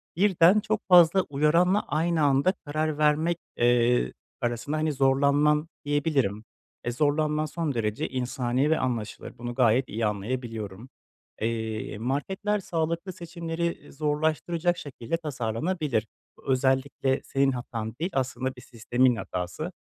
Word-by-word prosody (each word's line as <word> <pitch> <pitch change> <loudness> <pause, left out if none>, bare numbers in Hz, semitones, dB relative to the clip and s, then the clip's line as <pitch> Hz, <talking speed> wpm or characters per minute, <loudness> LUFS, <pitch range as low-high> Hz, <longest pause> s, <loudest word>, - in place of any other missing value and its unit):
birden 190 +1 +5
çok 215 0 -1
fazla 180 +1 +7
uyaranla 165 +8 +3
aynı 160 +2 +1
anda 140 +6 +3
karar 155 +1 -1
vermek, 155 +3 +2 0.2
eee, 120 - +3 0.3
arasında 120 +5 -2
hani 155 -1 0
zorlanman 140 +3 +3 0.2
diyebilirim. 140 -8 0 0.4
Eee, 120 - 0
zorlanman 150 +3 +1
son 155 -2 -2
derece 110 -2 -2
insani 130 +2 0
ve 160 - +2
anlaşılır, 120 -5 -4
bunu 120 0 -5
gayet 125 0 +3
iyi 110 +1 -1
anlayabiliyorum. 110 +1 -4 0.5
Eee, 110 -2 -2
marketler 190 - -1
sağlıklı 170 +1 -2
seçimleri, 170 -1 -4
iii, 145 - -17
zorlaştıracak 160 +4 0
şekilde 140 +1 -4
tasarlanabilir. 135 - -2 0.3
Bu 135 - -4
özellikle 130 +1 +1
senin 135 0 +1
hatan 115 -3 -5
değil, 175 +4 -2
aslında 130 0 -2
bir 125 - -12
sistemin 120 +1 +1
hatası. 90 -5 -4
140 Hz, 125 wpm, -27 LUFS, 120-160 Hz, 0.5 s, fazla